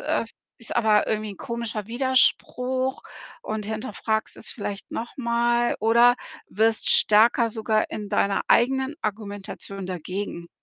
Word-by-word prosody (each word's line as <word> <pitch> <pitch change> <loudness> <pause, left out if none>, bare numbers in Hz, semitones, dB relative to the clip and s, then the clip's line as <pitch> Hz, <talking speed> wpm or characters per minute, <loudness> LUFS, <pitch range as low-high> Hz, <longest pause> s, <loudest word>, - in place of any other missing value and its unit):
äh, - - 0 0.3
ist 230 - -6
aber 215 -3 +3
irgendwie 215 -1 -2
'n 200 - -10
komischer 230 -2 -4
Widerspruch.“, 260 +1 +1 0.4
und 215 -1 -4
hinterfragst 220 0 -3
es - - -8
vielleicht 205 -3 -6
noch 235 - -5
mal 235 -1 +1
oder 235 +3 +5 0.3
wirst 220 +2 +1
stärker 230 +2 +5
sogar 215 -1 0
in 210 -1 -5
deiner 200 0 +1
eigenen 265 +4 +3
Argumentation 200 -2 -5
dagegen. 180 0 -5
220 Hz, 125 wpm, -24 LUFS, 210-240 Hz, 0.4 s, oder